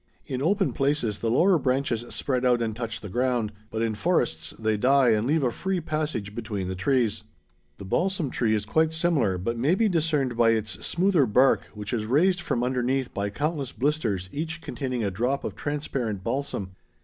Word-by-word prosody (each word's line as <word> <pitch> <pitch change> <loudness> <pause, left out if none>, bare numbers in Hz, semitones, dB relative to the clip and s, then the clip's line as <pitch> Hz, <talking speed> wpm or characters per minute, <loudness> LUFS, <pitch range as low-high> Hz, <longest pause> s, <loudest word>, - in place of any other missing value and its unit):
In 130 0 -4
open 195 +5 +1
places 135 -7 0
the 115 - -1
lower 175 - +4
branches 130 -3 0
spread 130 -2 -1
out 125 -1 +4
and 110 -2 -2
touch 115 -1 -4
the 105 - -7
ground, 120 0 0 0.2
but 110 0 -2
in 115 -1 0
forests 110 - 0
they 110 -1 0
die 130 +3 +4
and 110 +1 +2
leave 155 +1 +2
a 125 - +2
free 190 +7 -2
passage 150 -10 -3
between 105 -4 -4
the 95 - -2
trees. 110 +1 +1 0.5
The 100 - -9
balsam 175 - 0
tree 110 -3 +1
is 105 -1 -2
quite 160 +7 +2
similar 155 - +1
but 115 +6 -2
may 145 +9 +3
be 225 +3 +3
discerned 155 - +1
by 115 -1 +4
its 110 -1 -3
smoother 175 -5 +2
bark 130 +6 +4
which 105 +1 -5
is 110 -3 -1
raised 175 +8 +3
from 120 -7 -1
underneath 130 +1 0
by 100 0 -2
countless 145 +3 -2
blisters 120 -10 -1
each 160 +2 -4
containing 130 -7 -3
a 100 - 0
drop 125 +8 -1
of - - -3
transparent 130 -9 -3
balsam. 115 -6 -3
125 Hz, 190 wpm, -26 LUFS, 110-150 Hz, 0.5 s, lower